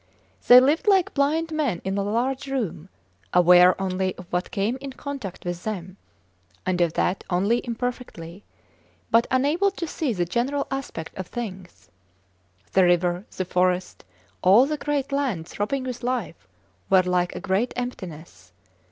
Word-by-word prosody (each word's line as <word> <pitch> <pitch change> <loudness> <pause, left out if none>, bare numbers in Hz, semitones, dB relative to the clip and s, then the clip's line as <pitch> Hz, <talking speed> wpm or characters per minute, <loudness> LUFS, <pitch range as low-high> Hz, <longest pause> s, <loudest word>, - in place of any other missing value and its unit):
They 245 - +11
lived 290 +9 +2
like 385 -3 +4
blind 315 +3 +1
men 285 - -1
in 190 0 -2
a 200 - 0
large 255 +7 -1
room, 215 - -3 0.5
aware 180 +1 +6
only 190 -1 -1
of 180 - -11
what 180 +1 -1
came 220 +3 -1
in 275 -1 -6
contact 265 -11 -7
with 175 0 -4
them 190 -4 -5 0.7
(and 185 -2 0
of 170 -2 +2
that 185 - 0
only 200 +6 +1
imperfectly), 230 -7 -5 0.7
but 230 +1 +4
unable 295 +10 +2
to 375 -3 -5
see 305 -3 -2
the 180 -5 -1
general 255 +10 -1
aspect 270 -12 -5
of 190 - -4
things. 190 -7 -7 0.8
The 190 - +4
river, 175 +2 +2
the 185 - -1
forest, 180 0 0 0.4
all 200 +8 +6
the 305 +2 -2
great 285 -2 -2
land 255 - -1
throbbing 255 +6 -2
with 250 -1 -5
life, 240 - -3 0.4
were 190 -1 +5
like 180 -1 0
a - - -4
great 200 +6 0
emptiness. 170 - -7
205 Hz, 150 wpm, -24 LUFS, 180-265 Hz, 0.8 s, They